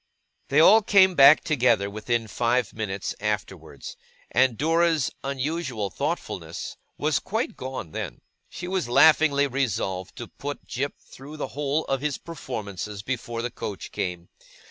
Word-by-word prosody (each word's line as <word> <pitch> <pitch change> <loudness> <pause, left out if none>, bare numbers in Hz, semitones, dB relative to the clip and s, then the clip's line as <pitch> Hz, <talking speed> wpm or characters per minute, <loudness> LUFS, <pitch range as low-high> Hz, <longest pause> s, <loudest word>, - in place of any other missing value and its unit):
They 140 - +4
all 210 +8 +8
came 190 -2 +5
back 140 -1 +7
together 120 -9 +2
within 110 +3 -2
five 120 +3 0
minutes 100 -3 -3
afterwards, - - -4 0.4
and 130 -3 +3
Dora's 165 -1 +2
unusual 135 - -2
thoughtfulness - - -4 0.2
was - - +1
quite - - -3
gone 130 -10 -6
then. - - -5 0.3
She 175 - -7
was 185 -8 -1
laughingly 150 +1 +5
resolved 110 -9 -2
to 120 -2 -7
put 145 -2 -7
Jip 140 +3 -3 0.2
through 145 +4 -10
the - - -4
whole 145 +2 -1
of 135 -1 -1
his 150 -2 -1
performances, 105 - -6
before 120 -1 -4
the 120 - -3
coach 100 -3 -6
came. 90 -1 -4
130 Hz, 140 wpm, -25 LUFS, 110-150 Hz, 0.4 s, all